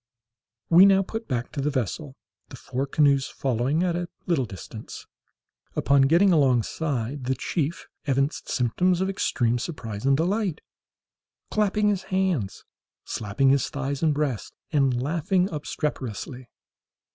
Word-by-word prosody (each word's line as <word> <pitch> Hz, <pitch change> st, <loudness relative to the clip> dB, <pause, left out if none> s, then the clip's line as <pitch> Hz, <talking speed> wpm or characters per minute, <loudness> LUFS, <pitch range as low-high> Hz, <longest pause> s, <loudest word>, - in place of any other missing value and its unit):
We 180 Hz, +4 st, +9 dB
now 195 Hz, 0 st, +5 dB
put 225 Hz, +4 st, -6 dB
back 120 Hz, -3 st, -2 dB
to 140 Hz, -, -3 dB
the 145 Hz, -, +1 dB
vessel, 135 Hz, -, -3 dB, 0.3 s
the -, -, -9 dB
four 135 Hz, +3 st, -3 dB
canoes 140 Hz, -1 st, +3 dB
following 135 Hz, +5 st, 0 dB
at 175 Hz, -2 st, 0 dB
a 175 Hz, 0 st, -3 dB, 0.2 s
little 160 Hz, -8 st, +1 dB
distance. 95 Hz, -6 st, -9 dB, 0.7 s
Upon 140 Hz, 0 st, +3 dB
getting 175 Hz, +5 st, +5 dB
alongside, 135 Hz, -1 st, +1 dB
the 130 Hz, +1 st, 0 dB
chief 155 Hz, +4 st, -2 dB, 0.2 s
evinced 140 Hz, +2 st, 0 dB
symptoms 175 Hz, +9 st, +1 dB
of 190 Hz, +1 st, +1 dB
extreme 120 Hz, -, 0 dB
surprise 115 Hz, -8 st, -5 dB
and 135 Hz, 0 st, +3 dB
delight, 185 Hz, 0 st, 0 dB, 0.9 s
clapping 210 Hz, 0 st, +2 dB
his 200 Hz, -3 st, 0 dB
hands, 185 Hz, -, -1 dB, 0.4 s
slapping 110 Hz, +6 st, 0 dB
his 140 Hz, -2 st, +2 dB
thighs 140 Hz, 0 st, -3 dB
and 160 Hz, -2 st, +3 dB
breast, 145 Hz, -6 st, -2 dB, 0.2 s
and 135 Hz, -5 st, +2 dB
laughing 170 Hz, +7 st, +1 dB
obstreperously. 130 Hz, -4 st, -4 dB
145 Hz, 135 wpm, -25 LUFS, 130-175 Hz, 0.9 s, We